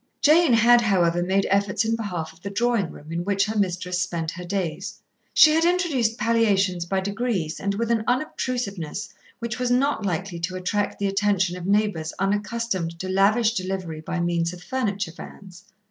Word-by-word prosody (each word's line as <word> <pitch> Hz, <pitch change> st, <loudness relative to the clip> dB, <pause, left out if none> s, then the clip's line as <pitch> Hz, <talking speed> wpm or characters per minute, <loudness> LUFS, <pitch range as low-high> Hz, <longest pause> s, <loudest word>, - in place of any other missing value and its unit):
Jane 310 Hz, -2 st, +5 dB
had, 235 Hz, +1 st, +6 dB
however, 175 Hz, -6 st, +2 dB
made 190 Hz, +2 st, +1 dB
efforts 200 Hz, +2 st, +1 dB
in 225 Hz, +1 st, +1 dB
behalf 180 Hz, -8 st, -4 dB
of 165 Hz, -, -23 dB
the 200 Hz, -, -5 dB
drawing 230 Hz, -3 st, 0 dB
room, 150 Hz, +2 st, -12 dB
in 170 Hz, +1 st, -2 dB
which 200 Hz, +1 st, +1 dB
her 220 Hz, +1 st, -4 dB
mistress 180 Hz, -2 st, -1 dB
spent 170 Hz, -3 st, -2 dB
her 180 Hz, +1 st, -8 dB
days. 180 Hz, -2 st, -3 dB, 0.3 s
She 310 Hz, -, +7 dB
had 320 Hz, +1 st, +3 dB
introduced 320 Hz, -11 st, +1 dB
palliations 200 Hz, -6 st, +2 dB
by 190 Hz, +2 st, -1 dB
degrees 200 Hz, -5 st, -2 dB
and 200 Hz, 0 st, -1 dB
with 230 Hz, +2 st, -1 dB
an 225 Hz, -2 st, +1 dB
unobtrusiveness 240 Hz, -, -2 dB, 0.3 s
which 235 Hz, 0 st, -5 dB
was 250 Hz, -1 st, 0 dB
not 255 Hz, -1 st, +1 dB
likely 185 Hz, -1 st, -3 dB
to 175 Hz, +2 st, -3 dB
attract 200 Hz, +3 st, -1 dB
the 200 Hz, -, -2 dB
attention 195 Hz, -2 st, +1 dB
of 180 Hz, 0 st, -6 dB
neighbours 200 Hz, -6 st, +1 dB
unaccustomed 200 Hz, -3 st, -1 dB
to 185 Hz, -, -5 dB
lavish 215 Hz, +4 st, +3 dB
delivery 185 Hz, -5 st, -4 dB
by 175 Hz, +2 st, -4 dB
means 170 Hz, 0 st, 0 dB
of 180 Hz, 0 st, -11 dB
furniture 205 Hz, -9 st, -2 dB
vans. 185 Hz, -1 st, -12 dB
200 Hz, 175 wpm, -24 LUFS, 180-230 Hz, 0.3 s, She